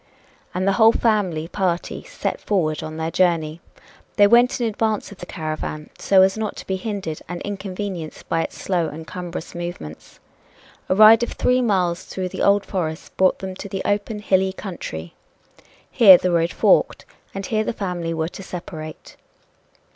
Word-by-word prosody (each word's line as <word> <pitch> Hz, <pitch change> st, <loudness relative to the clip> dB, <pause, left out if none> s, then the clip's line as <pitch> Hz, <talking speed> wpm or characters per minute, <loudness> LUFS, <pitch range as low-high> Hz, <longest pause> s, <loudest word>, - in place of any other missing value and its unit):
And 185 Hz, +1 st, 0 dB
the -, -, +5 dB
whole 220 Hz, 0 st, +8 dB
family 190 Hz, -9 st, 0 dB
party 180 Hz, -1 st, -2 dB
set -, -, -4 dB
forward 160 Hz, -7 st, 0 dB
on 155 Hz, 0 st, -6 dB
their 160 Hz, +1 st, -2 dB
journey. 165 Hz, -3 st, +1 dB, 0.5 s
They 205 Hz, -, +6 dB
went 240 Hz, +5 st, +4 dB
in 240 Hz, -, 0 dB
advance 220 Hz, -1 st, -1 dB
of 200 Hz, -, -12 dB
the 175 Hz, -, -8 dB
caravan 155 Hz, -1 st, -5 dB
so 190 Hz, -1 st, +5 dB
as 190 Hz, 0 st, +2 dB
not 220 Hz, -1 st, -3 dB
to -, -, -9 dB
be 190 Hz, -, -2 dB
hindered 190 Hz, -6 st, -4 dB
and 175 Hz, -1 st, -4 dB
inconvenienced 195 Hz, -4 st, -6 dB
by 165 Hz, -, +1 dB
its -, -, -5 dB
slow 175 Hz, -4 st, 0 dB
and 160 Hz, +2 st, -8 dB
cumbrous 175 Hz, -1 st, -7 dB
movements. 170 Hz, -, -8 dB, 0.7 s
A 185 Hz, -, +3 dB
ride 215 Hz, +2 st, +8 dB
of 240 Hz, -, -2 dB
three 250 Hz, 0 st, +2 dB
miles 185 Hz, -7 st, +1 dB
through 185 Hz, -1 st, -4 dB
the -, -, -6 dB
old 200 Hz, 0 st, +3 dB
forest 160 Hz, -5 st, -4 dB
brought 185 Hz, 0 st, +3 dB
them 190 Hz, -1 st, -6 dB
to 200 Hz, -, -7 dB
the 190 Hz, 0 st, -4 dB
open, 205 Hz, +2 st, -1 dB
hilly 190 Hz, -2 st, +1 dB
country. 85 Hz, -, -7 dB, 0.8 s
Here 195 Hz, -6 st, +9 dB
the 180 Hz, -, -1 dB
road 170 Hz, 0 st, +2 dB
forked. -, -, +2 dB, 0.3 s
And 195 Hz, 0 st, -4 dB
here 215 Hz, +1 st, 0 dB
the -, -, -2 dB
family 180 Hz, -6 st, -3 dB
were 160 Hz, 0 st, -2 dB
to 195 Hz, -, -10 dB
separate. 160 Hz, -4 st, -8 dB
185 Hz, 175 wpm, -22 LUFS, 165-205 Hz, 0.8 s, Here